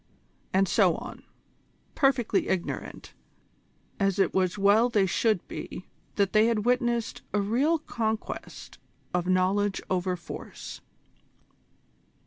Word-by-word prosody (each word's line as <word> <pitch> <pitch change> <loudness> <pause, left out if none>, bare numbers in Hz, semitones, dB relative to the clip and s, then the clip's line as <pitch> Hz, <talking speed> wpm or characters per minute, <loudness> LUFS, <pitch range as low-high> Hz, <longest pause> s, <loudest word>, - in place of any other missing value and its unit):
and 190 +1 +3
so - - +4
on, - - -8 0.7
perfectly 260 -7 +2
ignorant, 185 -2 -4 0.9
as 195 -1 +1
it 195 - +2
was 185 0 +1
well 205 +4 +4
they 210 -5 +3
should 210 +1 +1
be, 185 - -7 0.3
that 200 -2 +1
they 215 +1 +5
had 225 -2 0
witnessed 240 -2 0
a 210 - +2
real 250 +11 +2
conquest 225 -7 -4 0.3
of 180 0 0
Knowledge 190 +2 +2
over 185 0 0
Force. 170 - -9
205 Hz, 110 wpm, -27 LUFS, 190-230 Hz, 0.9 s, they